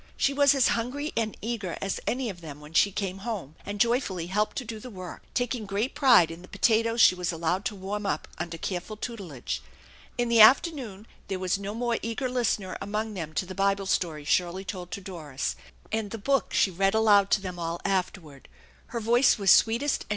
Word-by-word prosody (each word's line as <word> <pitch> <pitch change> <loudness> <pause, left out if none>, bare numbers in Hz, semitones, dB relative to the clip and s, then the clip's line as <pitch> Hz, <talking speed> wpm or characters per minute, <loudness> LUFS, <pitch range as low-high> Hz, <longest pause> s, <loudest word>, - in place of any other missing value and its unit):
She 275 - +2
was 285 0 +5
as 265 -3 +4
hungry 265 +6 -2
and 220 -2 -1
eager 220 -6 -3
as 195 - -2
any 255 +1 0
of 175 -2 -13
them 150 -3 -9
when 150 +1 -13
she 200 +4 +4
came 195 -1 -3
home, 195 - -5
and 205 0 -6
joyfully 230 -7 +1
helped 210 +4 -1
to 255 - -3
do 220 0 -6
the 250 - -9
work, 185 -5 -8
taking 245 -3 -1
great 205 +6 -1
pride 240 - +5
in 165 +1 -9
the 180 - -13
potatoes 230 +3 +2
she 200 - +8
was 180 -1 -2
allowed 170 +3 -1
to 210 - -2
warm 200 +2 -4
up 150 -4 -2
under 170 0 -4
careful 185 +5 -4
tutelage. 195 - -5 0.6
In 240 - +1
the 235 -1 +5
afternoon 240 - +4 0.2
there 190 - -2
was 185 +1 -1
no 200 +1 -5
more 235 0 -1
eager 230 +3 -2
listener 225 -6 -1
among 215 +2 -3
them 165 -5 -5
to 185 - 0
the 185 - -7
Bible 195 0 +1
story 160 -6 -1
Shirley 180 +4 0
told 180 -2 -6
to 200 - -6
Doris 160 -8 -4 0.4
and 220 -2 -1
the 225 - -5
book 270 +5 0
she 195 - +3
read 195 +3 +1
aloud 205 -3 +5
to 205 - +3
them 180 -2 -6
all 170 0 -3
afterward; 180 -7 -3 0.4
her 235 - -4
voice 240 +4 +4
was 195 -3 +4
sweetest 235 +6 +3
and. - - -30
200 Hz, 210 wpm, -27 LUFS, 180-230 Hz, 0.6 s, she